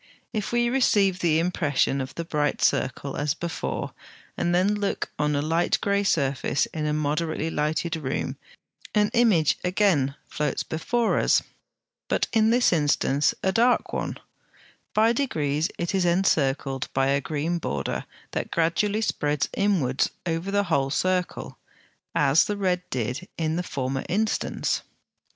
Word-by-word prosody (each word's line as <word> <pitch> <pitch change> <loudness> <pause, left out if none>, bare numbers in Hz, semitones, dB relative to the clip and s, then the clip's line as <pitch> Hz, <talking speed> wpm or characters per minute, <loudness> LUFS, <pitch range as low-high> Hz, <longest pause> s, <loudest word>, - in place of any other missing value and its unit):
If 210 -3 -2
we 240 0 +2
receive 205 -7 +3
the 165 -3 +2
impression 155 -5 +1
of 130 +1 -6
the 170 - -4
bright 150 -3 0
circle 135 +1 0
as 145 +1 0
before, 145 - -4 0.4
and - - -1
then 190 +3 +3
look 205 -1 -2
on 150 0 +1
a 145 - 0
light 165 +3 +1
grey 200 0 +1
surface 140 -6 +1
in 155 -1 -2
a - - 0
moderately 155 +2 -1
lighted 155 +2 -1
room, 140 -3 -3 0.6
an 210 0 +3
image 215 - +3
again 180 -8 +2
floats 150 - -2
before 230 +9 0
us; - - +3 0.6
but - - +1
in 220 -1 +4
this 240 -3 +4
instance 145 -2 +2
a 190 - +2
dark 240 +5 +2
one: - - -3 0.8
by 225 +2 +4
degrees 155 - 0
it 170 +3 -2
is 190 -2 +2
encircled 145 -7 +1
by 135 0 +3
a 140 0 +2
green 160 +4 -2
border 70 - -3 0.3
that - - -3
gradually 200 +6 +1
spreads 150 -9 0
inwards 170 -11 +1 0.2
over 165 +2 -2
the 205 +1 +2
whole 140 -7 +1
circle, 180 +4 -1 0.6
as 145 +1 +4
the 210 -1 -2
red 185 -3 +1
did 125 - -3
in 160 -1 0
the 175 - 0
former 135 -5 -3
instance. 215 +5 0
165 Hz, 145 wpm, -25 LUFS, 145-195 Hz, 0.8 s, in